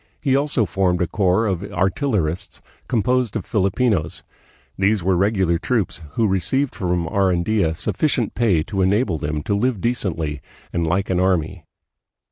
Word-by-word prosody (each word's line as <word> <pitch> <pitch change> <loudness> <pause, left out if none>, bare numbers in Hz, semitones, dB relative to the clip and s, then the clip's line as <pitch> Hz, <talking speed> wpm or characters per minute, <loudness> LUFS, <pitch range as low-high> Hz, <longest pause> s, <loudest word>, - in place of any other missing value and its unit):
He 135 -3 +1
also 140 -5 +1
formed 90 -1 0
a 90 - +2
corps 95 +4 +1
of 95 -5 -1
artillerists 95 - -1 0.3
composed 125 0 +1
of - - -3
Filipinos. 100 -3 0 0.5
These 100 0 +1
were 95 +1 +2
regular 95 -3 +1
troops, 110 -5 -1
who 115 - +2
received 100 - 0
from 90 -2 -1
Arandia 95 -2 +1
sufficient 120 - 0
pay 100 -10 +2
to 95 +2 -2
enable 95 -2 +1
them 75 +1 -3
to 100 - -1
live 115 +2 0
decently 85 - -2 0.3
and 85 -1 0
like 95 +4 0
an 90 - +1
army. 90 -2 0
95 Hz, 145 wpm, -21 LUFS, 85-110 Hz, 0.5 s, a